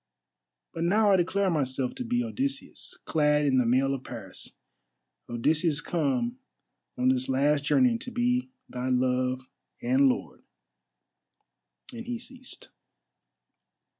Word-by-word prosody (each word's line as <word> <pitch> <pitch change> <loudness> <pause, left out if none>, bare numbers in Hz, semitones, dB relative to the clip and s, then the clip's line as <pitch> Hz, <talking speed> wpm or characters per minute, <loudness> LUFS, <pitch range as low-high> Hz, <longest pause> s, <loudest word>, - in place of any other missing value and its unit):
But 165 - -3
now 205 +4 +4
I - - +6
declare 190 +2 +1
myself 130 -4 0
to 255 - -5
be 245 0 0
Odysseus, 270 +4 -3
clad 150 -1 +2
in 130 -2 +3
the 125 - +2
mail 135 +3 +3
of 135 -1 -4
Paris—Odysseus 120 - -3
come 135 -8 -1 0.6
on 125 +1 +3
this 130 0 +1
last 140 +2 +2
journey 245 - +3
to 250 - -5
be 245 +1 0 0.2
thy 125 +1 -4
love 130 0 +1 0.4
and 260 +3 +4
lord." 250 - -3 1.5
And 235 0 -8
he 245 -1 -2
ceased. 255 +2 -10
150 Hz, 120 wpm, -28 LUFS, -, 1.5 s, I